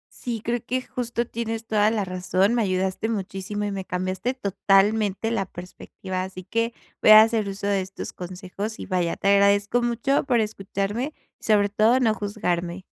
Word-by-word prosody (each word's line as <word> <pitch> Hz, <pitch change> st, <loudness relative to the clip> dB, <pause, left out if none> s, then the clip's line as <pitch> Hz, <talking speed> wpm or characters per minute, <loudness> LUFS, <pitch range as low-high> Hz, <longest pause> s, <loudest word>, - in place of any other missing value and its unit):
Sí, 235 Hz, -3 st, -4 dB
creo 240 Hz, +1 st, 0 dB
que 255 Hz, +2 st, -2 dB
justo 240 Hz, -1 st, -3 dB
tienes 225 Hz, -1 st, -4 dB
toda 215 Hz, -1 st, +3 dB
la 215 Hz, -3 st, -1 dB
razón, 185 Hz, +3 st, +1 dB
me 240 Hz, -, +2 dB
ayudaste 190 Hz, +2 st, -1 dB
muchísimo, 200 Hz, 0 st, -3 dB
y 205 Hz, -, -2 dB
me 195 Hz, -1 st, -4 dB
cambiaste 185 Hz, +8 st, -2 dB
totalmente 205 Hz, 0 st, +2 dB
la 195 Hz, -5 st, -1 dB
perspectiva. 185 Hz, +1 st, -7 dB
Así 185 Hz, 0 st, -7 dB
que 230 Hz, +5 st, -1 dB, 0.3 s
voy 215 Hz, -, +7 dB
a 215 Hz, 0 st, +11 dB
hacer 220 Hz, -3 st, 0 dB
uso 195 Hz, +1 st, -6 dB
de 200 Hz, -1 st, +1 dB
estos 190 Hz, +1 st, -7 dB
consejos, 185 Hz, +4 st, -6 dB
y -, -, -7 dB
vaya, 180 Hz, -3 st, 0 dB
te 195 Hz, -, +1 dB
agradezco 200 Hz, +3 st, +4 dB
mucho 240 Hz, +3 st, +1 dB
por 245 Hz, -3 st, +2 dB
escucharme, 210 Hz, +5 st, -2 dB, 0.3 s
y -, -, -24 dB
sobre 205 Hz, -2 st, +3 dB
todo 220 Hz, +5 st, +3 dB
no 225 Hz, -4 st, +3 dB
juzgarme. 185 Hz, -4 st, -3 dB
205 Hz, 175 wpm, -24 LUFS, 190-230 Hz, 0.3 s, a